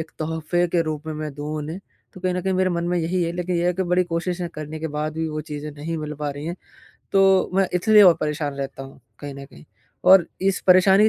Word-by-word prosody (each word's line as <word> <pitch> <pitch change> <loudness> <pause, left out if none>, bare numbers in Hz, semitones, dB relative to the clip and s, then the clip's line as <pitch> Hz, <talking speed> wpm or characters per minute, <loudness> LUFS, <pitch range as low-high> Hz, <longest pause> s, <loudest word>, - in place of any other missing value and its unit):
एक 160 - -6
तोहफ़े 160 +2 0
के 170 0 +2
रूप 155 -1 -4
में 155 - -4
मैं 150 -1 -5
दूँ 150 +2 -4
उन्हें। 160 +5 -5 0.3
तो 185 - -11
कहीं 185 0 0
न 180 - -1
कहीं 190 - 0
मेरे 185 0 +2
मन 170 -1 -1
में 180 - 0
यही 175 +2 0
है 170 - -1
लेकिन 180 0 -1
ये 170 - +1
है 180 - +3
कि 190 - 0
बड़ी 180 0 +2
कोशिश 175 +1 -3
करने 155 +1 -6
के 160 - -2
बाद 150 +1 -3
भी 160 0 -2
वो 155 0 -4
चीज़ें 150 0 -5
नहीं 150 +3 -5
मिल 150 0 -5
पा 145 -1 -1
रही 145 +1 -7
हैं। 175 +2 -4 0.6
तो 195 -1 +4
मैं 195 -1 +3
इसलिए 210 +4 +5
और 180 -3 +8
परेशान 150 -1 -2
रहता 135 -1 -5
हूँ 135 - -13 0.2
कहीं 145 -1 -7
न 140 - -9
कहीं - - -16 0.5
और 190 -3 +8 0.2
इस 195 0 +1
परेशानी 190 +2 +6
165 Hz, 255 wpm, -23 LUFS, 150-180 Hz, 0.6 s, और